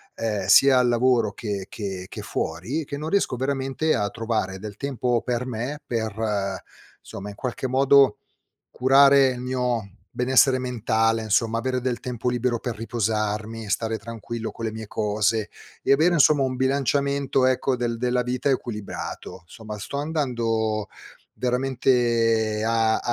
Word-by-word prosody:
ehm, 105 -4 -2
sia 135 +6 +7
al 125 -1 +3
lavoro 120 -2 +2
che 100 -2 -5
che 95 -3 -5
che - - -7
fuori, 100 - -3
che 140 0 -6
non 155 +2 -5
riesco 195 -10 +1
veramente 135 +3 0
a 105 -2 0
trovare 110 -5 -2
del 105 0 -7
tempo 125 -2 -1
per 125 0 -2
me, 125 +4 -4
per, 110 -4 -2 0.4
somma, 100 +1 -8
in 100 - -9
qualche 125 +2 -3
modo, 135 -1 +4 0.5
curare 135 +1 +6
il 125 -1 -4
mio 125 -4 -2 0.2
benessere 130 +1 +3
mentale, 115 -2 0
insomma 115 +1 +1
avere 130 +1 -1
del 125 -1 -2
tempo 125 -1 -4
libero 120 -1 0
per 120 -1 -4
riposarmi, 110 -1 -2
stare 110 +2 -1
tranquillo 115 +1 -6
con 115 - -6
le 110 - -3
mie 110 0 -6
cose 105 0 0 0.3
e - - +3
avere 160 +5 +3
insomma 150 -1 +5
un 130 -1 -2
bilanciamento 140 0 +1
ecco 130 0 +1
del 120 -1 -1
della 125 +1 +1
vita 125 +3 -1
equilibrato. 105 -6 -4
Somma, 105 +4 -9
sto 140 +7 -5
andando 115 -8 -1 0.5
veramente 120 -4 +1
a 115 -1 +2
120 Hz, 145 wpm, -24 LUFS, 110-130 Hz, 0.5 s, sia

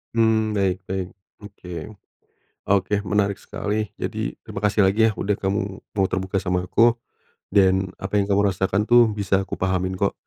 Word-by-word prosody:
Mmm, 110 -1 +2
baik 95 -2 0
baik 95 -1 -3 0.3
oke, 90 -4 -8 0.8
oke 100 +1 +1
menarik 100 +1 +1
sekali 105 0 -3
jadi - - -3
terima - - -10
kasih 105 0 +2
lagi 100 +4 +4
ya 110 - +2
udah 100 0 -1
kamu 100 +2 -1 0.3
mau 95 -2 +2
terbuka 95 +1 -1
sama 90 -2 -1
aku, 115 +5 +3 0.5
dan 95 -1 +3
apa 105 - -1
yang 100 - -1
kamu 100 +1 +3
rasakan 95 +3 0
tuh 120 0 +6
bisa 100 -2 0
aku 95 - -5
pahamin 95 0 -1
kok, - - +1
100 Hz, 165 wpm, -23 LUFS, 95-105 Hz, 0.8 s, tuh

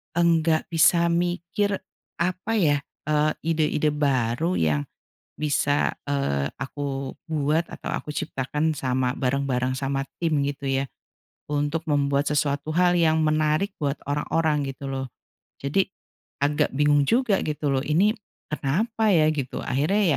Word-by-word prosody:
enggak 165 -2 +3
bisa 170 +1 +4
mikir, 175 +3 0 0.4
apa 185 +5 -1
ya, 150 -8 +3 0.3
eee, 150 0 +3
ide-ide 155 -2 +1
baru 140 +2 +1
yang 75 -2 +1 0.5
bisa, 145 -1 +1
eee, 70 - 0
aku 135 0 -4
buat 155 +1 +1
atau - - -6
aku 150 - -4
ciptakan 150 +1 -1
sama 130 -1 0
bareng-bareng 130 -1 0
sama 135 0 -1 0.2
tim 165 -2 0
gitu 140 0 -4
ya, 135 0 0 0.6
untuk 145 +3 -1
membuat 140 0 +2
sesuatu 145 +1 0
hal 175 0 +4
yang 160 -1 +3
menarik 155 +5 +1
buat 145 -1 -1
orang-orang 150 0 +1
gitu 135 +1 -6
loh. 135 -1 -3 0.6
Jadi 150 +9 +1 0.5
agak 145 -2 +1
bingung 145 0 +3
juga 230 -5 +3
gitu 150 -1 -2
loh, 135 - +2
"Ini 185 +8 +3 0.4
kenapa 215 - 0
ya?" 155 -2 +5
Gitu, 135 -4 -4
akhirnya 160 +11 +1
150 Hz, 130 wpm, -25 LUFS, 140-165 Hz, 0.6 s, ya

